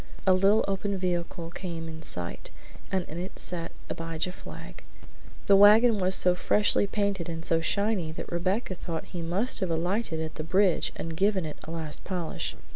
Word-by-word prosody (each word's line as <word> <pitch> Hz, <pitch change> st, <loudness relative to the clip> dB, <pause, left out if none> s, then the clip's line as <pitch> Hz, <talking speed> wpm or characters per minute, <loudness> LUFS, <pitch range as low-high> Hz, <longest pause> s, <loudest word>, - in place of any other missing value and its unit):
A 190 Hz, -, +6 dB
little 195 Hz, +4 st, +4 dB
open 195 Hz, 0 st, -1 dB
vehicle 175 Hz, -2 st, -2 dB
came 170 Hz, -3 st, -5 dB
in 160 Hz, 0 st, -8 dB
sight, 90 Hz, -, -3 dB, 0.4 s
and 190 Hz, -2 st, 0 dB
in 160 Hz, -, -6 dB
it 185 Hz, +2 st, -6 dB
sat 170 Hz, -2 st, -3 dB, 0.2 s
Abijah 165 Hz, +1 st, -3 dB
Flagg. -, -, -10 dB, 0.6 s
The 200 Hz, -, +6 dB
wagon 210 Hz, +3 st, +7 dB
was 185 Hz, 0 st, +4 dB
so 180 Hz, -, +4 dB
freshly 205 Hz, +2 st, +2 dB
painted 200 Hz, -4 st, -1 dB
and 165 Hz, 0 st, -5 dB
so 165 Hz, 0 st, +2 dB
shiny 200 Hz, -1 st, 0 dB
that -, -, -7 dB
Rebecca 185 Hz, +5 st, 0 dB
thought 170 Hz, -2 st, -5 dB
that -, -, -18 dB
he 175 Hz, -, -5 dB
must 185 Hz, +9 st, 0 dB
have 190 Hz, -3 st, -1 dB
alighted 170 Hz, +2 st, -1 dB
at 160 Hz, 0 st, -3 dB
the -, -, -5 dB
bridge 185 Hz, +2 st, +2 dB
and 165 Hz, 0 st, -5 dB
given 195 Hz, 0 st, +2 dB
it 155 Hz, -, -6 dB
a -, -, -9 dB
last 160 Hz, -2 st, -5 dB
polish. 180 Hz, -4 st, -3 dB
180 Hz, 185 wpm, -28 LUFS, 165-195 Hz, 0.6 s, wagon